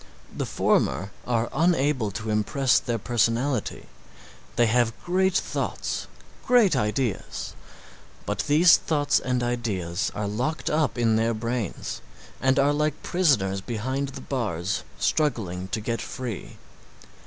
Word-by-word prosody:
The - - -2
former 100 +2 +1 0.2
are 120 -1 +1
unable 145 - +2
to 105 +2 -4
impress 120 +5 +2
their 120 -1 -2
personality; 120 +2 0 0.7
they 120 - +4
have 115 0 +2
great 190 +1 +2
thoughts, - - -2 0.4
great 230 - +4
ideas, 115 -1 -2 0.7
but - - -2
these 160 +4 +7
thoughts 145 -3 +1
and 125 -1 -1
ideas 100 -7 -1
are 105 0 -2
locked 125 +10 -2
up 150 -3 +1
in 115 -2 +3
their 115 +1 +1
brains 115 -2 -3 0.4
and 130 +1 +3
are 140 +1 +4
like 150 0 -1
prisoners 110 - +2
behind 130 +6 -2
the - - -8
bars 100 - -2 0.2
struggling 95 - 0
to 110 - -2
get 115 +2 -2
free. 125 -7 -6
120 Hz, 125 wpm, -25 LUFS, 110-145 Hz, 0.7 s, these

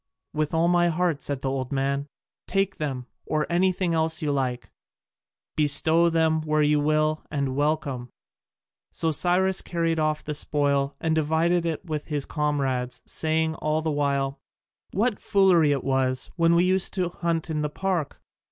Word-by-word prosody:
"With 155 -1 -1
all 165 +1 +2
my 175 0 +3
heart," 170 -3 0
said 140 -2 -4
the 135 - -1
old 130 -2 -3
man, 140 +1 -1 0.4
"take 195 +1 0
them, 135 -5 -3 0.2
or 155 -1 0
anything 180 0 +1
else 160 0 +1
you 150 -3 -1
like; 130 -3 -2 0.8
bestow 160 +3 +4
them 160 -1 +2
where 155 -1 +1
you 150 0 +3
will, 155 +1 +1
and 140 -3 -2
welcome." 145 -4 -1 0.8
So 160 - 0
Cyrus 185 +4 +3
carried 165 -2 -1
off 155 0 0
the 150 - -4
spoil, 140 -1 0
and 160 -1 0
divided 160 +2 +1
it 165 +3 -4
with 155 -3 -4
his 145 -3 -2
comrades, 135 -5 -2
saying 160 0 0
all 155 +1 -1
the 160 - 0
while, 140 -1 -1 0.5
"What 215 +2 0
foolery 180 -6 +4
it 140 -2 -1
was, 130 -1 0
when 170 -1 +3
we 170 - +4
used 185 +1 +1
to 180 -3 0
hunt 170 -1 -2
in 155 -1 -1
the 150 - -1
park! 180 -2 -2
155 Hz, 160 wpm, -25 LUFS, 145-170 Hz, 0.8 s, bestow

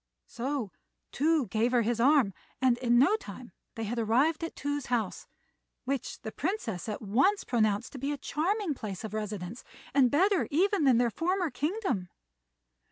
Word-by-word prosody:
So 250 -4 -3 0.4
Tou 310 0 +2
gave 225 +4 0
her 240 -2 +4
his 230 +1 0
arm, 260 -5 +4 0.3
and 255 -2 +3
in 240 -1 +3
no 285 - +5
time 225 - -10 0.2
they 225 - -4
had 235 +3 -2
arrived 260 +10 +2
at 330 - -4
Tou's 285 -1 -3
house, 230 -6 -2 0.6
which 270 -1 -3
the 220 - -5
Princess 250 - -3
at 215 - -5
once 270 - +2
pronounced 215 -2 0
to 270 - -8
be 275 +3 -2
a 290 - -2
charming 360 +5 -1
place 210 -7 -6
of 215 -2 -6
residence, 210 0 -5 0.3
and 265 -2 +5
better 370 - +3
even 360 +2 +2
than 255 -4 +5
their 240 -1 +2
former 355 - 0
kingdom. 300 - -2
255 Hz, 165 wpm, -29 LUFS, 220-310 Hz, 0.6 s, no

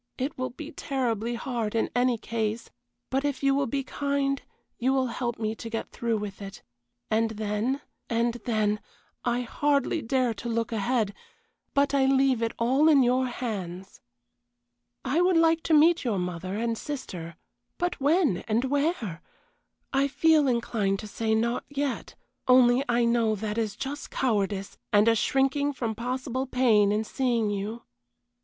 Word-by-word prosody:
It 270 +3 -2
will 255 0 -2
be 310 +5 -9
terribly 240 -6 -2
hard 230 -3 -3
in 225 - 0
any 245 -1 +3
case, 220 0 -3 0.4
but 270 +1 +1
if 285 -1 -2
you 275 0 +4
will 275 0 +1
be 275 +3 -1
kind 280 0 -1 0.4
you 260 +2 +2
will 265 -1 +2
help 240 -2 -2
me 220 -1 -1
to 230 +1 -8
get 225 0 -4
through 230 -2 -1
with 205 -1 -6
it, 195 -1 -9 0.5
and 225 +1 +2
then, 220 +5 -2 0.3
and 235 0 +1
then 215 -3 +1 0.4
I 240 0 +1
hardly 285 +4 0
dare 250 -1 +1
to 220 +3 -6
look 230 0 -1
ahead 225 -1 0 0.6
but 280 0 +3
I 270 -1 +3
leave 265 -3 +3
it 230 0 0
all 265 +7 +3
in 285 -4 +6
your 255 +1 +2
hands. 195 -7 -5 1.0
I 300 +7 +2
would 360 -1 +4
like 330 0 +4
to 325 - +2
meet 325 +3 +5
your 230 -6 0
mother 180 +1 -3
and 230 0 -1
sister 180 - -6 0.4
but 355 -4 -2
when, 295 - +3
and 230 +3 +1
where? 280 - -1 0.7
I 275 +1 +3
feel 310 +1 +4
inclined 225 -5 0
to 215 - -7
say, 220 +1 0
not 235 +2 0
yet, 285 -2 -3 0.3
only 255 0 +6
I 240 0 +3
know 230 -2 +2
that 210 +2 -3
is 215 -3 -2
just 280 +5 -5
cowardice, 200 -5 -1
and 210 +1 +5
a 230 - +6
shrinking 270 +5 +1
from 230 -4 -2
possible 255 +3 -3
pain 225 -6 +4
in 210 +1 +1
seeing 235 -2 0
you. 210 +4 -4
240 Hz, 160 wpm, -27 LUFS, 220-270 Hz, 1.0 s, in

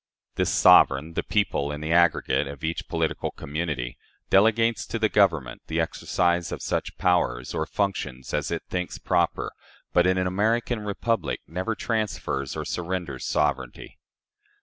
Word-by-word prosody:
This - - 0
sovereign 70 +5 +5
the - - 0
people, 90 -9 0
in 75 - -5
the 80 +1 -3
aggregate, 85 -4 +3
of 70 +1 -9
each 80 +1 -3
political 80 -1 -1
community 70 -4 -4 0.3
delegates 115 +2 +3
to 115 - -3
the 110 -1 +2
government 80 -13 +2
the 80 +1 -1
exercise 85 +1 0
of - - -5
such - - -2
powers, 85 -10 +1
or 80 - -2
functions, 80 -11 -3
as 75 +1 -1
it 85 - -3
thinks 90 -1 -3
proper, - - 0 0.4
but 90 +1 +4
in 95 0 +2
an 95 - +1
American 110 +5 +1
republic 105 +2 -2
never 95 +8 -3
transfers 105 - -2
or - - -3
surrenders 85 -6 -3
sovereignty. 70 -4 -2
85 Hz, 150 wpm, -25 LUFS, 75-100 Hz, 0.4 s, sovereign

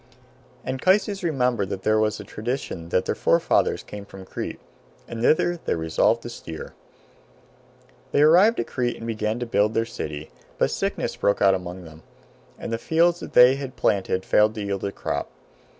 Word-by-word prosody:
Anchises 190 +9 +1
remembered 125 - 0
that 95 -1 -5
there 110 0 +3
was 110 0 0
a - - -7
tradition 105 -7 -5
that 90 - +1
their - - 0
forefathers - - +2
came 105 -1 -9
from 95 -1 -12
Crete - - -6 0.5
and 115 -1 -6
thither 170 +6 +2
they - - 0
resolved 80 -1 +1
to - - -6
steer. 80 -1 -8 1.4
They 145 - +4
arrived 185 +9 +5
at - - 0
Crete 120 -2 -2
and 115 - -8
began 110 -1 -2
to 120 - -3
build 105 -1 +1
their 115 - +2
city, 75 -7 -6 0.3
but - - +1
sickness - - -2
broke 100 - +1
out 95 -1 +5
among 90 0 -5
them, 80 -1 -13 0.6
and - - -5
the 115 - -1
fields 170 +5 +2
that - - -9
they 125 +2 +7
had 135 -2 -6
planted 95 -2 0
failed 105 +1 +3
to 105 - -4
yield 100 -1 -3
a 100 - -2
crop. 70 -6 -4
110 Hz, 180 wpm, -24 LUFS, 95-130 Hz, 1.4 s, they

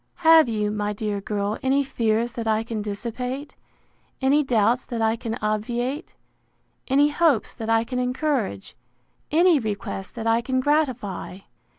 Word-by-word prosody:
—Have 320 -5 +6
you, 210 -2 -1
my 210 0 -2
dear 205 -1 -3
girl 205 +1 -2
any 270 +2 +2
fears 235 -2 0
that 230 -3 -4
I 220 0 +2
can 225 -2 -4
dissipate; 250 +7 -5 0.6
any 275 +3 +3
doubts 245 -2 +2
that 235 - -4
I 225 0 +2
can 225 0 -4
obviate; 240 +7 -2 0.7
any 285 +2 +4
hopes 295 -6 +2
that 225 -2 -6
I 225 0 +3
can 250 +2 -4
encourage; 250 - -2 0.5
any 335 0 +4
request 200 -4 -5
that 225 -1 -5
I 230 +1 +3
can 260 +2 -1
gratify? 255 -10 -1
235 Hz, 150 wpm, -24 LUFS, 215-270 Hz, 0.7 s, Have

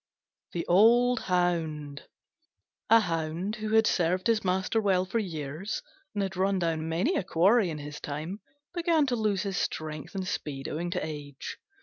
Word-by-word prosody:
THE 170 - -2
OLD 240 +6 +5
HOUND 160 -5 -1 0.8
A 225 0 +7
Hound 170 +2 -2
who 215 0 -1
had 220 0 +6
served 180 0 +1
his 230 -2 +2
master 190 +4 +1
well 190 -3 +2
for 195 +5 -1
years, 165 0 -4 0.3
and 205 - +1
had 190 -1 -3
run 195 +1 +2
down 165 -2 -1
many 185 - +1
a - - 0
quarry 190 +4 +4
in 155 - -4
his 145 0 -7
time, 155 +8 -5 0.3
began 335 -4 +2
to 255 -3 0
lose 210 -4 0
his 195 -3 -2
strength 155 +2 -3
and 190 -1 -3
speed 140 -6 -4
owing 170 +3 -3
to 180 -2 -2
age. 145 -3 -7
185 Hz, 165 wpm, -28 LUFS, 160-215 Hz, 0.8 s, A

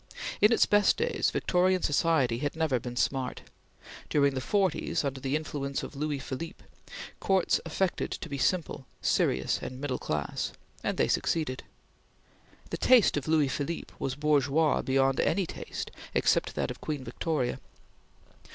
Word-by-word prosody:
In 210 - +6
its 230 - +5
best 205 -1 +4
days, 475 0 +1
Victorian 185 0 +2
society 145 -6 +2
had 145 +2 -2
never 155 -6 +1
been 120 +1 -6
"smart." 130 +1 -1 0.7
During 140 -2 +3
the 130 - -2
forties, 195 +4 0
under 135 -1 -2
the 135 +2 -1
influence 145 -3 -3
of - - -7
Louis 150 0 -1
Philippe, 140 +4 -6 0.6
Courts 190 -2 +2
affected 180 +3 -1
to - - -5
be 140 -1 -5
simple, 155 -5 0
serious 65 +1 +1
and 130 - -6
middle 135 -3 -2
class; 75 -1 -2 0.3
and - - -1
they - - +3
succeeded. 150 -6 0 1.1
The - - -2
taste 250 -5 +5
of 145 - -2
Louis 155 -2 +3
Philippe 145 +5 -4
was 135 -1 -2
bourgeois 150 +1 +2
beyond 135 0 +2
any 190 +2 +2
taste - - -6 0.2
except - - +2
that - - -1
of - - -10
Queen 150 -3 -3
Victoria. 130 -3 -2
145 Hz, 150 wpm, -29 LUFS, 135-165 Hz, 1.1 s, In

